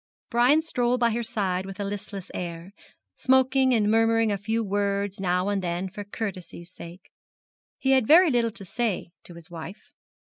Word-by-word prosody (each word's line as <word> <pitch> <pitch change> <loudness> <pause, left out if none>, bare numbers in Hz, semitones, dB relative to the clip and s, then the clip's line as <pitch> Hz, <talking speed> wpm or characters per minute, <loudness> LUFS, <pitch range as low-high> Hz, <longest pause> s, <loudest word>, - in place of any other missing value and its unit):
Brian 255 +6 +4
strolled 245 -4 0
by 235 -1 +3
her 235 +2 -1
side 200 -6 -1
with 195 +1 -9
a - - -1
listless 200 -1 -6
air, 170 +2 -6 0.4
smoking, 260 0 +3
and 215 -3 +2
murmuring 225 0 +3
a 200 - 0
few 225 +3 -1
words 200 -1 -1
now 180 0 0
and 200 -1 0
then 175 +1 -2
for 200 +2 -7
courtesy's 190 -4 -7
sake. 170 +2 -12 0.7
He 265 - 0
had 260 -4 +3
very 335 +1 +7
little 235 -2 +2
to 205 -3 -9
say 210 -3 -2
to 175 - -8
his 170 0 -12
wife. 175 +5 -10
205 Hz, 175 wpm, -25 LUFS, 185-235 Hz, 0.7 s, very